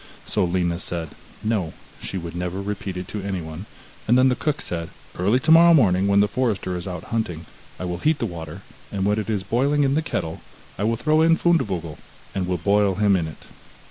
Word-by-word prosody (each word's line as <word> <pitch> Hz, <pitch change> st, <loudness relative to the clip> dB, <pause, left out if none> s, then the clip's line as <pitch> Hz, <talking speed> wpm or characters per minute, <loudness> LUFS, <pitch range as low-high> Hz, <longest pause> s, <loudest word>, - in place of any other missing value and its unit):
So -, -, +1 dB
Lina 85 Hz, -1 st, 0 dB
said, 85 Hz, -3 st, -4 dB, 0.3 s
no, 105 Hz, -7 st, -1 dB, 0.3 s
she 95 Hz, -, -4 dB
would 85 Hz, -1 st, -6 dB
never 90 Hz, +1 st, -3 dB
repeat 100 Hz, -2 st, -4 dB
it 90 Hz, -, -5 dB
to 105 Hz, -, -4 dB
anyone, 90 Hz, -1 st, -5 dB, 0.4 s
and 120 Hz, +3 st, +5 dB
then 130 Hz, +1 st, +5 dB
the 125 Hz, -, +2 dB
cook 150 Hz, +1 st, -1 dB
said: 85 Hz, -1 st, -4 dB, 0.3 s
'Early 100 Hz, +8 st, +2 dB
tomorrow 165 Hz, +3 st, +7 dB
morning, 95 Hz, -, +4 dB
when 100 Hz, 0 st, +4 dB
the 105 Hz, -, +3 dB
forester 110 Hz, -7 st, -1 dB
is 90 Hz, +1 st, -5 dB
out 90 Hz, -3 st, -5 dB
hunting, 85 Hz, -8 st, -2 dB, 0.3 s
I 90 Hz, -, -3 dB
will 90 Hz, -1 st, -3 dB
heat 155 Hz, -, +2 dB
the 120 Hz, -, -1 dB
water, 80 Hz, -6 st, -7 dB, 0.3 s
and 95 Hz, -1 st, -1 dB
when 105 Hz, +1 st, +2 dB
it 110 Hz, -, -4 dB
is 105 Hz, -3 st, -1 dB
boiling 140 Hz, +8 st, +2 dB
in 135 Hz, -1 st, +2 dB
the 155 Hz, -, +2 dB
kettle, 80 Hz, -, -3 dB, 0.3 s
I 100 Hz, -, -2 dB
will 115 Hz, +1 st, +1 dB
throw 155 Hz, +5 st, +2 dB
in 165 Hz, 0 st, +5 dB
Fundevogel, 100 Hz, -, 0 dB, 0.3 s
and 95 Hz, -2 st, -2 dB
will 90 Hz, -1 st, 0 dB
boil 100 Hz, +2 st, +2 dB
him 100 Hz, 0 st, +3 dB
in 85 Hz, -3 st, 0 dB
it. 80 Hz, -, -11 dB
100 Hz, 210 wpm, -23 LUFS, 90-120 Hz, 0.4 s, tomorrow